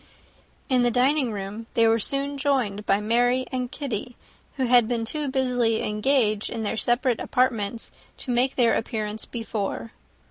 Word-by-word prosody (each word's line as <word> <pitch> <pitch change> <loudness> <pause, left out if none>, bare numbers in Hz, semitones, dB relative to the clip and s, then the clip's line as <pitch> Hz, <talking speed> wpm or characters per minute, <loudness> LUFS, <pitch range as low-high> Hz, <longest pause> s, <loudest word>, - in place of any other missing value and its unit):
In 255 -3 +2
the 245 - +3
dining 255 +2 +2
room 205 +2 -6
they 230 -1 +4
were 225 +1 +3
soon 275 +5 0
joined 250 -8 0
by 200 - +3
Mary 245 +4 +1
and 250 -1 -3
Kitty, 250 -4 -5 0.4
who 260 - +1
had 240 -2 +5
been 235 -1 -1
too 300 +5 +1
busily 250 -4 +1
engaged 215 -1 +1
in 225 -1 -4
their 205 - -2
separate 240 +1 +1
apartments 230 -4 -1 0.3
to 255 - -5
make 250 +2 +1
their 235 -3 +3
appearance 215 -2 -2
before. 225 -1 -4
240 Hz, 155 wpm, -25 LUFS, 220-255 Hz, 0.4 s, had